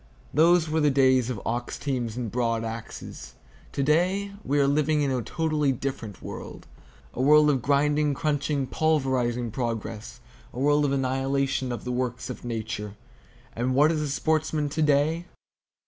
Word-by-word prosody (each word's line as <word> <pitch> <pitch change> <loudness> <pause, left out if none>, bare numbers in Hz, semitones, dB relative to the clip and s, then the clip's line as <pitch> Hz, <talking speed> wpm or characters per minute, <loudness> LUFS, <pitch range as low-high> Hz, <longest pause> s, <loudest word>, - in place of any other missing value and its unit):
Those 165 +2 +4
were 160 +1 0
the 150 -1 +4
days 130 -3 +3
of 120 -5 -3
ox 120 +1 -3
teams 125 -5 -3
and 120 -4 -3
broad 115 -2 0
axes. 110 - -7 0.4
To 140 - 0
day, 185 +7 +1
we 145 - 0
are 140 - +4
living 150 +1 +2
in 140 - 0
a 130 -2 0
totally 155 +1 0
different 120 -6 -5
world,—a 65 - -10
world 150 +2 +6
of 135 -3 0
grinding, 145 +2 +2
crunching, 145 -2 0
pulverizing 130 -6 0
progress, 115 -2 -4 0.3
a 125 - -6
world 145 +2 +3
of 140 - 0
annihilation 135 0 0
of 120 - -5
the 125 - -3
works 125 0 -2
of - - -9
Nature. 110 -3 -4 0.6
And 125 +2 0
what 150 +3 +5
is 155 -2 -1
a 150 - -2
sportsman 155 0 0
to 155 +2 -2
day? 150 +3 +2
135 Hz, 160 wpm, -26 LUFS, 120-150 Hz, 0.6 s, world